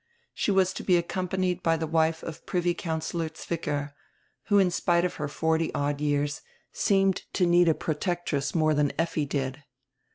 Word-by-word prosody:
She - - -1
was 190 -2 +3
to - - -6
be 180 -2 +4
accompanied 180 +1 -1
by 165 -1 +2
the 160 - -2
wife 160 0 +1
of 165 - -7
Privy 175 -1 +1
Councillor 160 -1 -3
Zwicker, 150 -3 -4 0.5
who 205 - +3
in 190 -3 +4
spite 175 0 +2
of 180 - -3
her 150 - -2
forty 160 +2 0
odd 145 0 -1
years 145 0 0 0.3
seemed 195 -1 +2 0.2
to 180 - +2
need 175 0 +5
a 160 - +3
protectress 160 -3 -2
nrore 155 -2 +2
than 145 -1 +1
Effi 160 -2 0
did. 135 0 -3
165 Hz, 170 wpm, -27 LUFS, 150-175 Hz, 0.5 s, need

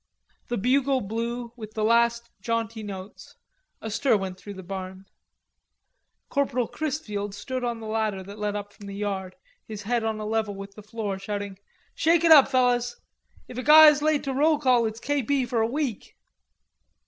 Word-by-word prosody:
The 240 - -2
bugle 260 +5 +2
blew 235 +3 -4
with 215 -3 -10
the 215 - -1
last 235 +1 +2
jaunty 230 0 -2
notes, 195 -1 -9 0.5
a 220 - -4
stir 230 +1 +2
went 190 -2 -5
through 205 -1 -9
the 190 - -9
barn. 190 +1 -7 1.2
Corporal 255 -4 0
Chrisfield 210 -10 -4
stood 255 +3 -4
on 235 -1 -2
the 225 - -8
ladder 215 -3 -1
that 200 +2 -11
led 210 0 -2
up 205 0 -6
from 200 - -12
the 200 - -7
yard, 195 -2 -3 0.3
his 210 -2 -7
head 235 +2 0
on 220 -1 -2
a 215 - -4
level 215 -1 -1
with 195 0 -9
the 210 - -11
floor 210 -2 -4
shouting: 200 -1 -5 0.3
"Shake 330 +1 +3
it 330 - +5
up, 290 -4 +9
fellers! 245 -2 +2 0.5
If 250 - -7
a - - -1
guy's 300 0 +8
late 305 -1 +2
to 275 - -2
roll 300 +3 +3
call, 250 -5 +3
it's 220 +1 -6
K. 290 +3 0
P. 265 +1 0
for 235 -1 0
a 220 - +2
week." 260 -4 -3
225 Hz, 185 wpm, -26 LUFS, 205-255 Hz, 1.2 s, up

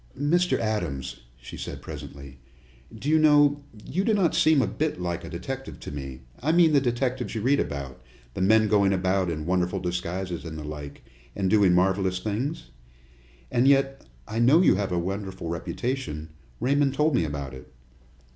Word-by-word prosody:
"Mr. 175 +5 +2
Adams," 105 - -3 0.2
she - - -10
said - - -6
presently, 70 -2 -9 0.5
"do 110 +5 -8
you 155 +1 +4
know, 145 -1 +5 0.2
you 185 +7 -1
do 220 +1 +2
not 185 -5 +2
seem 155 -2 +4
a 130 - +3
bit 145 +5 -2
like 85 -1 -3
a - - -7
detective 135 +10 -6
to - - -8
me 65 -3 -7 0.2
I 150 +5 +1
mean 165 -2 +5
like 140 - +5
the 125 - +1
detectives 125 -1 -2
you 110 - -2
read 140 +5 +3
about 70 -3 -4 0.3
the - - -4
men 110 +3 +4
going 100 -2 +3
about 95 0 +1
in 75 -2 -4
wonderful 90 +1 0
disguises 90 0 -3
and 80 -2 -7
the 75 - -6
like, 75 -1 -8 0.3
and 95 -2 0
doing 100 -5 +5
marvelous 95 0 +2
things? 105 - -3 0.8
And 120 +3 +3
yet, 135 0 +3 0.2
I 110 - -3
know 140 +9 +5
you - - +6
have 100 -1 -1
a 90 - 0
wonderful 95 -1 -4
reputation 85 - -4 0.3
Raymond 140 +2 +2
told 150 +2 +2
me 90 - +2
about 70 -3 -4
it." 65 - -12
100 Hz, 180 wpm, -26 LUFS, 85-135 Hz, 0.8 s, you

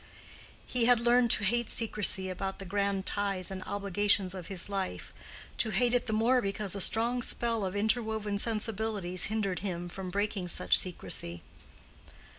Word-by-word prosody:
He 245 -2 0
had 245 -1 +5
learned 240 0 +4
to 210 - +5
hate 235 +4 +1
secrecy 210 -4 0
about 190 +1 -4
the 195 - -8
grand 200 0 -1
ties 195 -2 -2
and 190 -1 -5
obligations 200 -1 0
of 185 -3 -7
his 190 -3 -3
life—to 200 +3 -4
hate 235 +4 +2
it 245 - +1
the - - -1
more 235 +4 +3
because 200 -1 -2
a 200 - -2
strong 235 +5 +2
spell 230 -2 +1
of 190 0 -3
interwoven 220 -1 0
sensibilities 215 -4 0
hindered 200 -5 -1
him 175 -3 -4
from 185 +1 -6
breaking 200 -1 -2
such 180 +1 +3
secrecy. 85 - -1
205 Hz, 155 wpm, -30 LUFS, 190-225 Hz, -, had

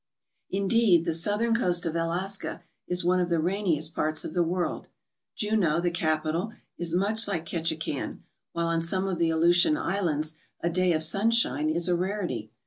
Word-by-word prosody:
Indeed, 195 -3 +3
the 165 - 0
southern 210 +8 +1
coast 180 -7 +2
of 165 -1 -2
Alaska 175 +4 -2 0.2
is 180 -1 0
one 180 +1 +3
of 180 -1 0
the 170 -1 +1
rainiest 170 -3 0
parts 155 0 0
of - - -5
the 175 - +2
world. 175 +1 -1 0.5
Juneau, 205 -7 +1
the 175 0 0
capital, 165 +4 -1 0.2
is 170 -1 -1
much 210 +4 +1
like 170 -5 -2
Ketchikan, 165 -1 -3 0.3
while 170 0 -1
on 165 0 +1
some 185 +3 -1
of 180 -3 -2
the 165 -1 +2
Aleutian 175 - +4
Islands 170 - -1 0.3
a 170 - -1
day 185 +1 +2
of 155 0 +2
sunshine 195 - +1
is 170 +2 +1
a 180 - +2
rarity. 180 - -3
175 Hz, 170 wpm, -27 LUFS, 165-195 Hz, 0.5 s, Aleutian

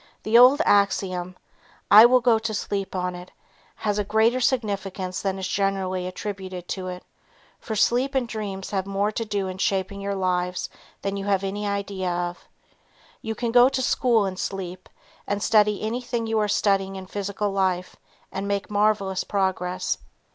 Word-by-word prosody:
The 220 - 0
old 255 +6 +7
axiom, 185 -3 +1 0.5
"I 220 +3 +10
will 250 +1 +4
go 235 -2 +4
to 220 -1 -3
sleep 195 -2 -3
on 180 0 -1
it," 180 +1 -9 0.5
has 210 -1 -1
a - - +1
greater 220 +5 +2
significance 200 -7 -1
than 195 -1 -1
is 190 -1 -3
generally 190 -1 -1
attributed 185 -2 -6
to 185 -1 -4
it, 180 0 -6 0.6
for 220 - -5
sleep 250 +6 +2
and 255 -3 +1
dreams 200 -4 -5
have 195 -1 -1
more 200 +2 0
to 230 - -3
do 205 -3 -2
in 185 0 -6
shaping 195 0 -1
your 200 0 -2
lives 180 -1 -1 0.3
than 200 0 -2
you 195 - -4
have 200 -1 +1
any 205 +2 -3
idea 200 -2 -2
of. 175 0 -4 0.7
You 220 0 -4
can 235 +1 -2
go 245 +2 +7
to 270 -1 -1
school 235 -4 +2
in 190 -1 -4
sleep 185 -1 -5 0.4
and 205 0 -1
study 210 -2 +3
anything 235 +1 -2
you 225 -1 0
are 210 - +1
studying 195 -2 +1
in 190 -1 -7
physical 200 +1 -3
life 185 -2 -1 0.4
and 195 +1 -4
make 200 0 -2
marvelous 205 -2 +1
progress. 185 -2 -1
200 Hz, 170 wpm, -24 LUFS, 190-215 Hz, 0.7 s, I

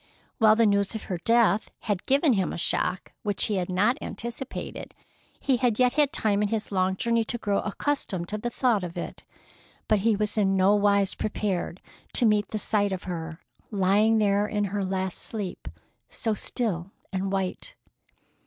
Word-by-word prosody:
While 215 -2 +6
the 230 0 +4
news 200 +1 +2
of 220 - -5
her 180 -2 -4
death 230 0 +3
had 205 -3 -2
given 275 +1 +4
him 190 -4 0
a - - -5
shock 180 +2 -1
which 205 -2 -1
he 210 - 0
had 180 -1 -2
not 210 +10 +2
anticipated, 235 +3 -6 0.4
he 265 -3 +2
had 240 -4 +1
yet 250 -1 +3
had 290 -1 +3
time 205 -2 +2
in 210 - +2
his 215 0 -3
long 190 -1 +1
journey 230 +3 +1
to 240 - -2
grow 205 -3 0
accustomed 205 -6 -2
to 215 - -3
the 240 - -2
thought 235 -5 +1
of 175 -1 -6
it. - - -6 0.7
But 215 - +3
he 220 +2 +2
was 210 +1 0
in 195 -1 +2
no 190 +2 +5
wise 200 -1 +3
prepared 195 -4 -2 0.3
to 245 - +3
meet 210 -2 +3
the 215 - -4
sight 205 -1 +1
of 185 -1 -4
her 165 -2 -5 0.3
lying 205 +2 +3
there 205 -1 +2
in 210 -1 -1
her 205 -1 0
last 190 -1 -2
sleep, 205 -5 -4 0.4
so 225 -2 -1
still 195 -4 -2 0.2
and 190 0 -1
white. 195 - -2
205 Hz, 180 wpm, -26 LUFS, 190-225 Hz, 0.7 s, While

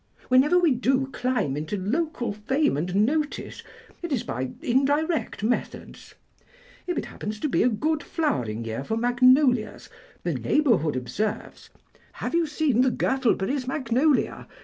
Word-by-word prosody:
Whenever 265 +7 +5
we 345 -4 +4
do 260 +2 +1
climb 245 - -1
into 155 +7 -3
local 240 - -2
fame 265 - 0
and 180 +7 +1
notice, 300 +3 -2 0.4
it 345 -2 -5
is 250 -4 0
by 130 - -3
indirect 285 +2 0
methods; 235 +3 -4 0.7
if 355 - -2
it - - -2
happens 210 0 -6
to 300 - -1
be 270 - +1
a 250 - +4
good 300 +7 -1
flowering 120 - -2
year 115 +4 -4
for 220 +9 -2
magnolias 245 -1 +3 0.3
the - - -1
neighbourhood 225 - +1
observes: 205 +12 -4 0.4
'Have - - -5
you 335 -1 +2
seen 295 -5 +1
the 260 - +4
Gurtleberry's 255 0 0
magnolia? 265 +1 0
255 Hz, 140 wpm, -25 LUFS, 210-295 Hz, 0.7 s, Whenever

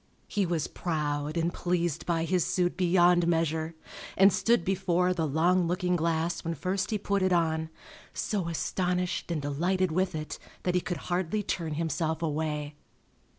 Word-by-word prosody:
He 200 -3 0
was 165 -3 0
proud 150 -2 -2
and 170 +1 0
pleased 175 -3 -1
by 165 -2 +1
his 180 0 +1
suit 180 -1 0
beyond 175 -1 +4
measure, 160 -1 0 0.4
and 195 +1 +7
stood 200 0 +2
before 180 -1 +1
the 165 -3 -1
long 170 +4 +2
looking 180 +1 0
glass 165 0 0
when 165 0 -2
first 190 +2 -1
he 215 - 0
put 200 -1 0
it 185 0 +2
on, 160 -2 +1 0.4
so 200 -6 -2
astonished 180 +2 -1
and 170 -2 -1
delighted 175 +6 0
with 185 +1 0
it 155 0 -5 0.2
that 180 - +1
he 180 - +2
could 175 - -3
hardly 185 +4 0
turn 165 -5 -2
himself 160 +1 -1
away. 150 -1 -2
175 Hz, 160 wpm, -29 LUFS, 160-185 Hz, 0.4 s, and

